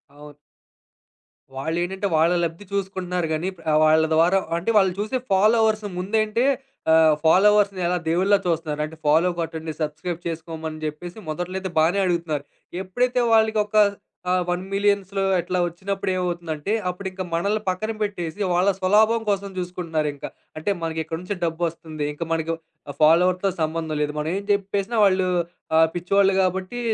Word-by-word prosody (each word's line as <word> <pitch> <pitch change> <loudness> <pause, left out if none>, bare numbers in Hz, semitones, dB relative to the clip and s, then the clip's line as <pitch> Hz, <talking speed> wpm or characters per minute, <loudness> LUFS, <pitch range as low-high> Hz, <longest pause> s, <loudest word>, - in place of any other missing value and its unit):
అవును. 145 0 -13 1.2
వాళ్ళేంటంటే 175 +7 -2
వాళ్ళ 160 +2 +4
లబ్ది 165 +4 -4
చూసుకుంటున్నారు 185 -3 -2
గానీ, 165 +5 -1 0.3
వాళ్ళ 155 0 +5
ద్వారా 170 +4 +4 0.2
అంటే 180 +7 -1
వాళ్ళు 190 -3 +4
చూసే 215 +5 -1
ఫాలోవర్స్‌ని 215 +1 +3
ముందేంటే 215 +4 0 0.5
ఆహ్, 160 -1 +6
ఫాలోవర్స్‌ని 200 +2 +4
ఎలా 175 +1 +1
దేవుడిలా 190 +5 +3
చూస్తున్నారు. 160 -3 -1
అంటే 155 +1 -6
ఫాలో 160 +4 +4
కొట్టండి, 160 -1 -4
సబ్‌స్క్రయిబ్ 160 +3 -3
చేసుకోమని 160 -1 -5
జెప్పేసి 155 +5 -5
మొదట్లయితే 185 +4 -3
బానే 165 +5 +3
అడుగుతున్నారు. 165 -5 -1 0.4
ఎప్పుడైతే 245 +6 0
వాళ్ళకొక 220 -1 +3 0.6
ఆహ్, 185 0 +2
1,000,000లో 195 +1 0 0.2
అట్లా 180 +2 -2
ఒచ్చినప్పుడేమవుతుందంటే 175 -2 -3 0.2
అప్పుడింక 185 +1 -5
మనల్ని 200 +6 0
పక్కన 185 +4 -1
బెట్టేసి 180 -4 -3
వాళ్ళ 180 +3 +3
స్వలాభం 215 +4 +3
కోసం 200 0 -1
జూసుకుంటున్నారింక. 165 -5 -3 0.3
అంటే 155 - -3
మనకి 160 -1 -3
ఇక్కడినుంచే 180 +5 -5
డబ్బొస్తుంది. 165 -2 -3
ఇంక 160 +3 -4
మనకి 165 0 0 0.5
ఫాలోవర్స్‌తో 180 +5 +4
సంబంధం 160 0 -2
లేదు. 150 0 -1
మనం 150 +1 -2
ఏం 200 - -4
జెప్పేసినా 200 +2 -1
వాళ్ళు 185 -1 +2 0.5
ఆహ్, 160 0 +6
పిచ్చోళ్ళు 195 +2 +2
గాబట్టి 190 +5 -1
180 Hz, 125 wpm, -23 LUFS, 160-200 Hz, 1.2 s, ఆహ్